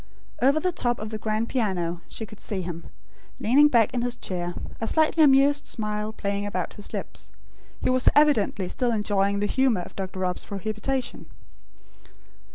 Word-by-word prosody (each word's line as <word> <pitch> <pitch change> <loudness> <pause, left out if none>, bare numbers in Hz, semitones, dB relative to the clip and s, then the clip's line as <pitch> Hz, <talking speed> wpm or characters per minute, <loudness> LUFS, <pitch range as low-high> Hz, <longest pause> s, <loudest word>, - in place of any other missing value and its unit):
Over 275 +5 +4
the 365 +3 0
top 240 -7 0
of 215 0 -6
the 215 - -4
grand 215 +1 -1
piano, 180 -8 -1
she 220 - -6
could 215 0 -14
see 190 -3 -3
him, 170 -1 -6 0.5
leaning 275 +7 +5
back 235 -7 +3
in 245 - 0
his 245 0 -1
chair; 175 -5 -4 0.3
a 225 - -1
slightly 315 +3 +3
amused 285 0 +5
smile 210 -1 -2
playing 200 -2 -3
about 185 -3 -3
his 205 - -5
lips. - - -6 0.5
He - - +1
was 255 0 +4
evidently 225 -10 +3
still 245 +5 0
enjoying 200 -2 +1
the - - +1
humour 245 -3 +2
of - - -10
Dr. 190 -1 -5
Rob's 180 -1 -2
prohibition. 215 +6 -3
215 Hz, 165 wpm, -25 LUFS, 200-255 Hz, 0.5 s, leaning